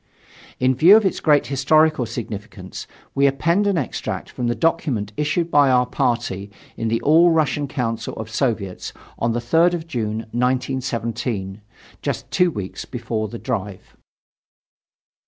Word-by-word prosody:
In 130 +1 +3
view 170 - +7
of 220 - +1
its 190 - 0
great 150 -3 +3
historical 145 0 +2
significance, 105 -4 -7 0.3
we 140 0 +4
append 170 +9 +1
an 200 -3 +2
extract 140 - -4
from 120 - -3
the 120 - 0
document 140 -11 0
issued 165 +5 -1
by 145 -2 +5
our 125 -1 +4
party 105 -6 -1 0.3
in 115 - -3
the 115 +1 +1
All 165 +4 +5
Russian 150 -3 +1
Council 115 -4 -3
of 110 - -6
Soviets 110 -5 -2 0.3
on 115 0 +1
the 120 - 0
3rd 165 +9 +3
of 165 -2 -6
June, 110 -8 -3
1917, 120 -5 -2 0.4
just - - -4
two 180 -1 +3
weeks 100 - -6
before 115 -3 -3
the 115 +3 -7
drive. 105 -6 -5
125 Hz, 145 wpm, -21 LUFS, 115-155 Hz, 0.4 s, view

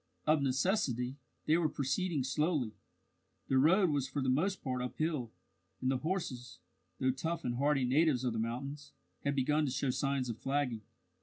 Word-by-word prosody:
Of 155 -1 +4
necessity, 135 - 0 0.3
they 155 +2 +4
were 165 -3 +2
proceeding 145 +2 -1
slowly 145 -2 0 0.8
the 130 - +4
road 175 +5 +5
was 140 -3 0
for 130 +2 -3
the 130 -1 0
most 185 +9 0
part 125 -1 -2
uphill, 130 0 -2 0.5
and 130 - +1
the 135 - +1
horses, 135 -7 -3 0.4
though 130 - +3
tough 165 +6 -3
and 120 -1 -1
hardy 140 -1 +2
natives 135 0 +3
of 125 -2 0
the 115 - -2
mountains, 135 +6 -4 0.3
had 140 0 0
begun 150 +3 +2
to 135 - -1
show 135 0 0
signs 135 -1 0
of 115 -2 -4
flagging. 135 -5 -1
135 Hz, 170 wpm, -33 LUFS, 125-155 Hz, 0.8 s, road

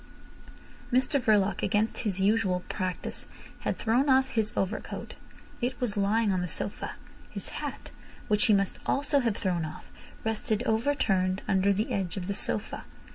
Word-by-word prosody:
Mr 260 +3 +3
Verloc, 210 -3 +3
against 215 +2 +1
his 200 -5 -2
usual 195 -3 +2
practice, 185 -1 -3 0.3
had - - -1
thrown 245 +6 +2
off 265 0 +5
his 220 -2 0
overcoat. 195 +3 -2 0.5
It 250 +2 -1
was 240 -5 0
lying 205 +1 +2
on 185 - +1
the 180 - -1
sofa. 190 +5 -2 0.4
His - - -6
hat, - - -6 0.4
which 210 +2 +3
he 215 - +6
must 195 -1 0
also 285 +1 +2
have 230 -5 0
thrown 180 -4 0
off, 155 - -7 0.4
rested 220 0 0
overturned 220 -6 +1
under 195 +1 +3
the 205 +3 0
edge 190 -2 -1
of 185 - -3
the 200 - -1
sofa. - - -2
210 Hz, 155 wpm, -29 LUFS, 190-230 Hz, 0.5 s, he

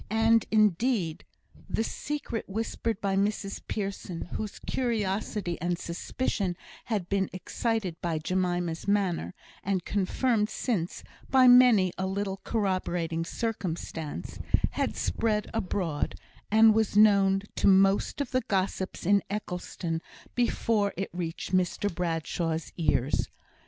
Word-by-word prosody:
And, 225 +1 +4
indeed, 215 -4 +2 0.4
the 225 - 0
secret 270 -3 -4
whispered 225 +1 -2
by 195 -1 0
Mrs 200 0 -1
Pearson, 195 -4 -4
whose 215 -2 -4
curiosity 210 -6 -2
and 175 +1 0
suspicion 180 +1 -2 0.3
had 205 -6 -2
been 195 -1 0
excited 190 -1 -2
by 170 -2 -1
Jemima's 175 0 -1
manner, 185 - 0 0.3
and 190 -2 -1
confirmed 210 +2 +1
since 190 -10 -2 0.3
by 260 -1 +6
many 245 -7 +7
a 190 - 0
little 195 0 -2
corroborating 180 -6 -1
circumstance, 170 - -4 0.3
had - - -1
spread 210 -2 0
abroad, 180 -7 -1 0.3
and 220 +1 +7
was 220 -2 +1
known 200 -2 +5
to - - +3
most 195 +7 +4
of 275 - -3
the 255 - +2
gossips 190 -3 -2
in 200 +2 +4
Eccleston 180 -4 -3 0.3
before 225 -4 +1
it 195 - -3
reached 175 0 -4
Mr 185 +2 0
Bradshaw's 165 -1 -2
ears. 150 -4 +1
195 Hz, 115 wpm, -28 LUFS, 175-220 Hz, 0.4 s, many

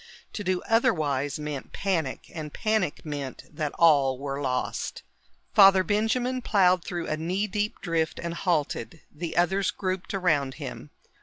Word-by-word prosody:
To 205 - -4
do 185 -1 0
otherwise 155 - +1
meant 150 -2 -6
panic, 170 -9 -2
and 155 -3 -6
panic 215 -8 -1
meant 145 -3 -5
that 150 -3 -2
all 140 -6 +4
were 140 +1 -4
lost. 130 -2 -2 0.5
Father 195 -2 +7
Benjamin 230 +6 0
plowed 185 -6 +3
through 175 -1 -4
a 155 - -1
knee 180 +6 -1
deep 210 0 -2
drift 165 -3 -1
and 170 0 -3
halted. 160 - -1
The 165 +2 -5
others 190 +3 +2
grouped 185 0 -3
around 145 -8 +1
him. 130 - -7
170 Hz, 145 wpm, -27 LUFS, 145-195 Hz, 0.5 s, Father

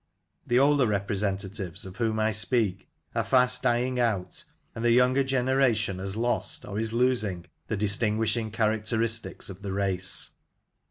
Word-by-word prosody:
The 120 - +2
older 140 -1 +4
repre 100 -1 -1
sentatives 95 -2 -3
of 95 0 -10
whom 110 -2 0
I 110 0 +2
speak 105 -2 0 0.2
are - - 0
fast 125 -1 +3
dying 125 +1 +1
out, 110 -7 -1 0.3
and 115 - -6
the 120 - +3
younger 125 +3 +4
generation 130 -7 +1
has 95 +1 -5
lost, 120 +1 -1
or 100 - -4
is 110 0 -1
losing, 115 -7 0 0.2
the 110 - -2
distinguishing 110 +2 +1
characteristics 110 +1 -1
of 95 +1 -12
the 100 -1 -5
race. 95 -2 -1
110 Hz, 150 wpm, -27 LUFS, 100-125 Hz, 0.3 s, older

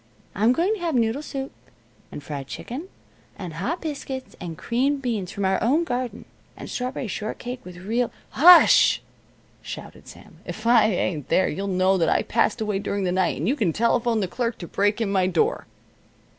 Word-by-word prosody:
I'm 220 +5 +3
going 345 +10 +1
to 435 - -4
have 335 -4 -1
noodle 230 +3 +1
soup, 270 -3 -5 0.6
and 145 - -8
fried 140 -2 -6
chicken, 270 - -7 0.5
and 180 -4 -7
hot 245 - -3
biscuits, 275 -4 -6
and 165 -3 -6
creamed 270 +4 0
beans 215 -7 -2
from 200 - -3
our 190 0 +1
own 285 +9 +2
garden, 245 -6 -4 0.3
and - - -8
strawberry 250 0 -4
shortcake 240 +5 -5
with 180 -1 -11
real 225 +6 -1 0.2
" - - -34
"Hush!" 350 +1 +7 0.6
shouted - - -9
Sam. - - -14
"If 220 - -8
I 235 -2 +6
ain't 180 - -2
there, 185 - +3
you'll 195 +5 -4
know 185 0 +2
that 165 - +2
I - - +2
passed 220 +2 +1
away 210 -2 -1
during 200 0 -2
the 180 - 0
night, 185 -1 +1
and 155 - -2
you 265 - +2
can 205 - 0
telephone 235 +1 +1
the 190 - -1
clerk 235 +4 -2
to 170 - -8
break 205 +5 0
in 205 -3 0
my 190 -2 +2
door." 175 -3 0
220 Hz, 190 wpm, -24 LUFS, 185-255 Hz, 0.6 s, Hush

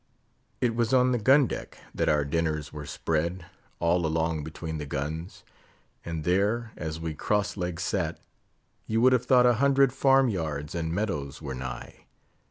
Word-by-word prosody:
It 120 -2 +2
was 120 +2 +2
on 125 0 +4
the 120 - +1
gun 135 +6 +5
deck - - -6 0.2
that - - 0
our 75 -1 +2
dinners 75 -1 -1
were 75 -1 -7
spread; 80 +3 -2 0.3
all 85 +1 +2
along 80 -1 0
between 80 0 -6
the 75 - -5
guns; 80 +6 -5 0.6
and 80 -2 -4
there, 105 +7 +1
as 80 -1 -5
we 80 -1 -3
cross 105 +6 0
legged 90 -3 -3
sat, 90 -3 -1 0.7
you 110 +1 +1
would 130 +1 +6
have 125 0 +1
thought 125 -1 +6
a 120 - +6
hundred 140 -2 +4
farm 135 -1 +4
yards 80 -7 -3
and 80 -1 -2
meadows 80 -8 -2
were 70 -4 -5
nigh. 65 0 -7
85 Hz, 170 wpm, -27 LUFS, 80-115 Hz, 0.7 s, would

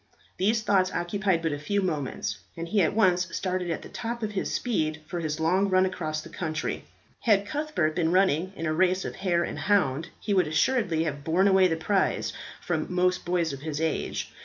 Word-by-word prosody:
These 215 +4 +2
thoughts 190 -3 +3
occupied 185 -1 0
but 165 - +1
a 145 - -4
few 200 +7 0
moments, 140 - -2 0.2
and 165 0 -4
he 200 +4 +2
at 180 - +1
once 180 -5 +3
started 185 -2 -2
at 165 - -3
the - - -9
top 235 0 -4
of 215 - -1
his 200 - -2
speed 160 -10 -1
for 175 +3 -4
his 155 -1 -3
long 185 +5 +2
run 185 0 +4
across 155 -4 -3
the 165 - -11
country. 160 -2 -3 0.3
Had 205 -3 +3
Cuthbert 295 - -1
been 165 -2 +1
running 185 -1 +2
in 165 - -4
a 155 - 0
race 185 +3 +2
of - - -5
hare 175 -3 +1
and - - -4
hound, 170 -6 +1
he 205 - -1
would 185 -5 +3
assuredly 165 +1 +1
have 145 -3 -4
borne 175 +6 +3
away 190 -1 +5
the 165 - 0
prize 195 +4 0 0.3
from 160 -2 -2
most 180 0 +1
boys 170 -3 0
of 135 - -6
his 155 -1 -4
age. 160 0 -2
180 Hz, 210 wpm, -27 LUFS, 160-195 Hz, 0.3 s, away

